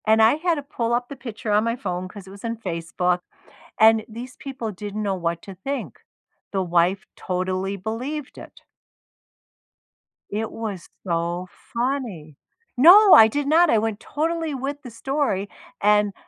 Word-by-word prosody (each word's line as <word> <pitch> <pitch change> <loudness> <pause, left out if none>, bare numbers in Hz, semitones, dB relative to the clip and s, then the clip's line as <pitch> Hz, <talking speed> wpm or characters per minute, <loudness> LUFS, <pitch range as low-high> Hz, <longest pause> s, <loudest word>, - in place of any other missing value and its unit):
And 220 0 +4
I 220 +5 +6
had 335 +2 +1
to 290 - -5
pull 235 -4 -2
up 245 0 -1
the 280 - -7
picture 230 -4 -6
on 210 +1 +4
my 230 0 0
phone 185 -5 -4
'cause 195 0 -11
it - - -11
was 200 0 -13
in 230 0 -3
Facebook, 180 -2 -1 0.6
and 220 0 +6
these 240 +4 -9
people 270 -7 -5
didn't 205 +2 -6
know 195 -2 0
what 170 -2 -2
to 195 - -9
think. 275 +9 -5 0.5
The 195 - 0
wife 175 +2 +1
totally 185 +2 -2
believed 255 +9 -5
it. - - -12 1.7
It 215 +2 -3
was 205 -6 -6 0.2
so 170 +1 -2 0.3
funny. 235 - -3 0.4
No, 370 - +9
I 220 - +9
did 285 +5 -2
not, 330 +3 +5
I 230 - +4
went 220 -1 -2
totally 325 +1 -2
with 275 +2 -4
the 250 - -9
story 230 -5 -1 0.3
and 210 0 +3
220 Hz, 160 wpm, -23 LUFS, 190-270 Hz, 1.7 s, No